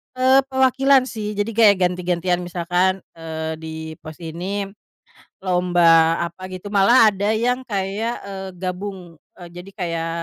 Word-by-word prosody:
Eee, 260 +1 +4
perwakilan 265 0 +3
sih 210 -2 -5
jadi 205 +1 -2
kayak 215 -3 +7
ganti-gantian 180 0 0
misalkan, 180 +2 0 0.2
eee, 160 -1 -5
di 160 0 -8 0.3
pos 155 +2 -12
ini, 185 +5 -4 0.7
lomba 180 -1 0 0.4
apa 185 +2 -10
gitu. 185 +1 -8
Malah 205 +4 +4 0.2
ada 200 +2 -1
yang 245 +4 0
kayak, 210 0 -2
eee, 195 -1 -6
gabung, 185 -1 -6 0.2
eee, 175 -1 -10
jadi 180 +2 -9
kayak 165 -2 -2
190 Hz, 135 wpm, -21 LUFS, 175-215 Hz, 0.7 s, kayak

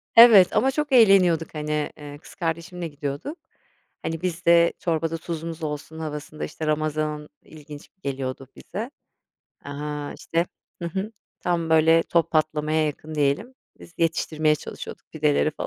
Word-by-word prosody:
Evet, 225 -6 +9
ama 265 +4 +3
çok 295 +1 -2
eğleniyorduk, 190 - +5
hani, 150 0 -2
eee, 145 -1 -9
kız - - -15
kardeşimle 170 0 -3
gidiyorduk. 145 - -5 0.7
Hani, 165 0 -3
biz 175 -1 -3
de 170 0 +6
çorbada 165 -1 -1
tuzumuz 165 -1 -6
olsun 155 +1 -5
havasında, 150 0 -5
işte, 155 - -6
ramazan 155 0 -1
ilginç 150 -1 -12
geliyordu 135 -1 -4
bize. 225 +8 -6 0.7
Aaa, 145 0 -5
işte, 170 +1 -1 0.4
hı 170 - -1
hı, 195 +5 -4 0.3
tam 170 -2 -1
böyle 160 +1 +5
top 170 0 +1
patlamaya 155 0 +1
yakın 150 +1 -6
diyelim, 150 - 0 0.3
biz 175 - -14
yetiştirmeye 155 -2 +2
çalışıyorduk - - -9
pideleri 155 0 +2
falan. - - -5
160 Hz, 140 wpm, -24 LUFS, 150-170 Hz, 0.7 s, Evet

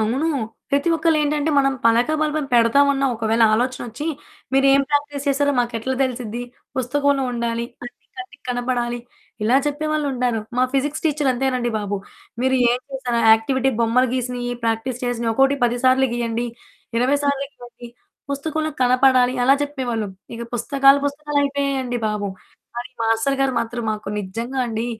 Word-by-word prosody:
అవును. 220 +4 0 0.5
ప్రతి 280 +3 +1
ఒక్కళ్ళేంటంటే 305 -2 +1
మనం 275 0 +3
పలక, 230 +3 +4
బల్బం 305 -1 0
పెడతామన్న 275 +4 +4
ఒకవేళ 225 0 +1
ఆలోచనొచ్చి, 245 +3 -2 0.5
మీరేం 270 +1 +5
ప్రాక్టీస్ 290 0 -1
చేసారో 285 +1 +2
మాకెట్లా 240 +1 -1
తెలుసిద్ది? 245 -3 -3 0.3
పుస్తకంలో 280 +2 +1
ఉండాలి, 235 -1 -2 0.2
కంటి 245 - -8 0.3
కంటికి 370 -6 -10
కనపడాలి 245 -1 -1 0.4
ఇలా 235 +5 +4
చెప్పేవాళ్ళు 305 +1 -1
ఉంటారు. 245 -3 0 0.2
మా 250 - +3
ఫిజిక్స్ 285 +3 -1
టీచర్ 295 -3 +1
అంతేనండి 250 -1 0
బాబు! 205 -1 -3 0.4
"మీరేం 250 -1 +2
చేసారు 250 -3 -1
యాక్టివిటీ 260 +4 +2
బొమ్మలు 240 +3 +3
గీసినయి, 245 -1 -2
ప్రాక్టీస్ 230 +2 -1
చేసినయి 235 -1 -1
ఒక్కోటి 270 +4 +3
10 240 0 +1
సార్లు 260 +1 +5
గీయండి, 235 0 -1 0.5
20 255 +4 +3
సార్లు 280 -1 0
ఇవ్వండి, 245 -2 -13 0.4
పుస్తకంలో 310 +2 -2
కనపడాలి" 255 0 +4
అలా 270 +2 +5
చెప్పేవాళ్ళు. 250 -7 -3 0.3
ఇగ 230 - -6
పుస్తకాలు 275 +3 +4
పుస్తకాలైపోయాయండి 280 -3 -1
బాబు! 210 -1 -2 0.5
కాని, 240 +2 -5
మాస్టర్ 225 +5 +1
గారు 270 -1 +2
మాత్రం 235 +1 -4
మాకు 215 -1 -4
నిజంగా 230 +7 -4
అండి 225 0 -3
255 Hz, 135 wpm, -21 LUFS, 235-280 Hz, 0.5 s, మీరేం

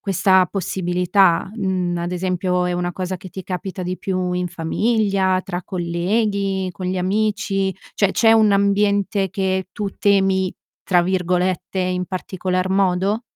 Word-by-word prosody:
questa 190 -1 +3
possibilità? 180 -1 +1
Mhmm, 185 -4 -1
ad 175 +1 -3
esempio 180 0 0
è 180 - 0
una 175 0 -2
cosa 185 +1 -4
che 185 - -10
ti 190 +1 -8
capita 185 +1 -5
di 180 +1 -4
più 185 -2 -2
in 180 0 -1
famiglia, 190 +2 +1
tra 175 0 -4
colleghi, 190 +2 -1
con 180 +1 -6
gli 185 +1 -1
amici? 195 0 0 0.2
Cioè 200 -2 +2
c'è 225 0 +4
un 220 -2 +5
ambiente 200 0 +2
che 190 0 -1
tu 205 +1 -3
"temi", 195 -2 +2 0.3
tra 180 -2 +3
virgolette, 180 +1 -1
in 180 0 0
particolar 185 0 -2
modo? 195 +3 +1
185 Hz, 145 wpm, -20 LUFS, 180-195 Hz, 0.3 s, un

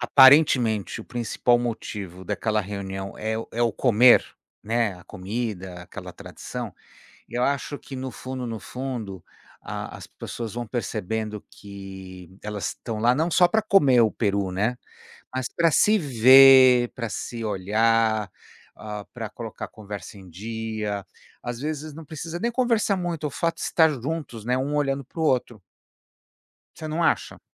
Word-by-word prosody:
aparentemente 130 - +5
o - - -10
principal 120 0 +1
motivo 105 -6 -5
daquela 110 +4 0
reunião 95 -1 -6
é 110 +1 -2
o 115 - -5
é 115 - -3
o 115 -3 +2
comer, 120 +1 +5 0.4
né, 115 -2 0
a - - -16
comida, 95 -3 -5
aquela 90 - -9
tradição. - - -7 0.6
Eu 120 +1 -2
acho 140 +1 -1
que 135 - -9
no 130 0 -4
fundo, 130 +1 -6
no 115 -2 -5
fundo, 120 -8 -6 0.4
a - - -6
as - - -10
pessoas 115 -3 -7
vão 120 0 -4
percebendo 110 -2 -3
que 95 -2 -11
elas 105 -4 -3
estão 110 -2 -5
lá 120 +3 +4
não 160 +5 0
só 175 +2 +5
para 220 -1 +2
comer 145 - +5
o 110 - +3
peru, 100 -3 -1
né, 110 +6 0 0.6
mas 130 -1 -1
para 170 -1 +3
se 215 +7 +4
ver, 130 - +7
para 115 -3 -4
se 115 0 -5
olhar, 110 +1 +1 0.4
ah, 105 -1 -7
para 115 -3 -5
colocar 115 0 -7
conversa 105 -2 -9
em 95 -2 -13
dia, 105 +1 -4 0.4
às 120 0 -5
vezes 155 0 -4
não 160 0 -10
precisa 160 +2 -6
nem 235 - 0
conversar 230 -5 +1
muito, 170 -4 -3
o - - -3
fato 165 +4 -1
de - - -7
estar 160 -2 +4
juntos, 130 -4 -5
né, 125 - +2
um 140 +3 -2
olhando 135 -2 0
para 160 - -9
o - - +1
outro. 125 -6 0 1.1
Você 155 - -7
não 160 +2 -1
acha? - - 0
115 Hz, 160 wpm, -24 LUFS, 105-135 Hz, 1.1 s, ver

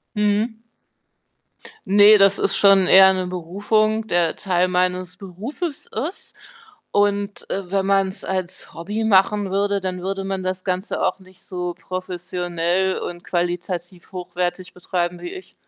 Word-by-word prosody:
Mhm. 210 +2 0 1.3
Ne, 205 +2 +8
das 195 0 +5
ist - - +1
schon 195 -2 +6
eher 190 +1 +8
'ne 185 -1 -2
Berufung, 210 +5 0
der 175 -4 +1
Teil 180 -2 +1
meines 180 0 -1
Berufes 220 - -6
ist 295 - -6 0.6
und, 205 0 0
äh, 190 -2 -4
wenn 195 -1 +1
man's 195 -1 0
als 185 -1 -4
Hobby 210 +6 -3
machen 200 -1 +3
würde, 200 +1 +1
dann 185 -1 -4
würde 195 +1 -3
man 195 -1 -3
das 185 0 -3
Ganze 185 +1 -2
auch - - 0
nicht 185 -1 -18
so 180 -1 -5
professionell 180 0 -2
und 175 0 -7
qualitativ 175 0 -3
hochwertig 180 0 -4
betreiben 175 -1 -3
wie - - -5
ich. 375 0 -10
190 Hz, 140 wpm, -21 LUFS, 180-205 Hz, 1.3 s, Ne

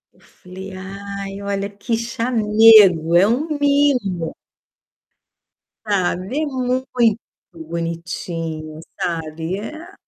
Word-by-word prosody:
Eu - - -27
falei: 190 +2 -11
"Ai, 195 +1 -7
olha 200 0 -3
que 205 +3 -3
chamego, 220 -7 +5
é 185 +3 +6
um 250 +8 +1
mimo". 260 - +1 1.5
Ah, 195 -5 +1
vê 250 - -3
muito 260 -1 -2 0.7
bonitinho, 165 -1 -5 0.2
sabe, 165 +1 -3
eh 220 +9 -7
a, 345 +5 -12
200 Hz, 95 wpm, -20 LUFS, 170-230 Hz, 1.5 s, é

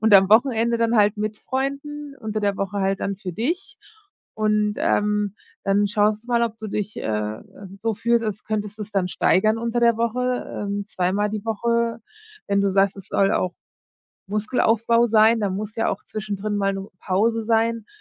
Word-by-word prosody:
und 220 -1 +5
am 190 0 +7
Wochenende 235 0 +4
dann 230 0 +2
halt 210 0 +4
mit 210 0 -3
Freunden, 280 +2 -4
unter 215 -2 -3
der 200 -1 0
Woche 195 +1 -3
halt 195 0 0
dann 200 -1 -2
für 185 -3 -6
dich. 315 - -3 0.6
Und, 210 -1 +1
ähm, 210 -1 +1 0.3
dann 200 +1 +2
schaust 210 +2 +1
du - - -20
mal, 235 -1 +2
ob 225 -1 -2
du 215 0 -6
dich, 205 +1 -3
äh, - - -5
ähm, 110 - -5
so 225 -1 0
fühlst, 235 +2 +1
als 215 -1 -4
könntest 210 0 -3
es 210 0 -6
dann 185 -2 +1
steigern 215 +4 +2
unter 235 +1 -1
der 235 -1 +4
Woche, 250 +2 -1 0.2
ähm, 200 0 -2
zweimal 200 +2 0
die 215 0 -4
Woche. 235 +1 0 0.5
Wenn 200 0 +2
du 200 -1 +2
sagst, 195 +1 +2
es 195 - -11
soll 195 0 +2
auch 180 -1 0 0.7
Muskelaufbau 230 +2 +2
sein, 225 +1 +5
da 200 - 0
muss 210 +3 -5
ja 225 - +1
auch 200 - -3
zwischendrin 210 -1 -4
mal 195 -1 +1
'ne 195 +1 -6
Pause 220 +4 +1
sein, 230 0 +1
215 Hz, 185 wpm, -23 LUFS, 200-230 Hz, 0.7 s, am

